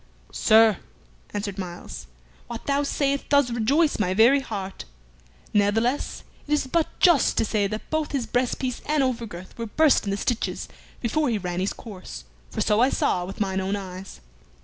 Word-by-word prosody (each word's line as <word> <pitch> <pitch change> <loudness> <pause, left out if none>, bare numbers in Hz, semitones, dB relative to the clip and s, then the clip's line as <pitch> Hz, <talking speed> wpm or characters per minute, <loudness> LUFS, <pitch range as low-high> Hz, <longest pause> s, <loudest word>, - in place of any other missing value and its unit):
"Sir," 220 -2 +5 0.5
answered 200 -1 -4
Myles, 175 - -7 0.4
"what - - -7
thou 280 0 +1
sayest 280 -1 -1
doth 285 -4 +4
rejoice 275 +7 +2
my 185 -2 +1
very 240 +7 +6
heart. 195 - -6 0.7
Ne'theless, 225 +6 +1 0.2
it 295 - 0
is 295 - 0
but 320 +4 +1
just 345 -8 +4
to - - +3
say 205 -2 +1
that 215 +2 -6
both 310 -1 -1
his 270 -5 -1
breast 245 0 0
piece 255 -2 -3
and 300 -2 +2
over 245 -3 -1
girth 180 -2 -10
were 230 - -3
burst 305 +5 +3
in - - -2
the 200 - -1
stitches 235 +3 -2 0.3
before 285 +5 +1
he 225 - +1
ran 180 -2 -3
his 190 +2 0
course, 195 - -9 0.3
for - - -3
so 210 0 +2
I 250 +3 +5
saw 180 -8 0
with 195 - -8
mine 190 -2 0
own 195 +2 -1
eyes." 190 - -8
225 Hz, 180 wpm, -25 LUFS, 195-275 Hz, 0.7 s, very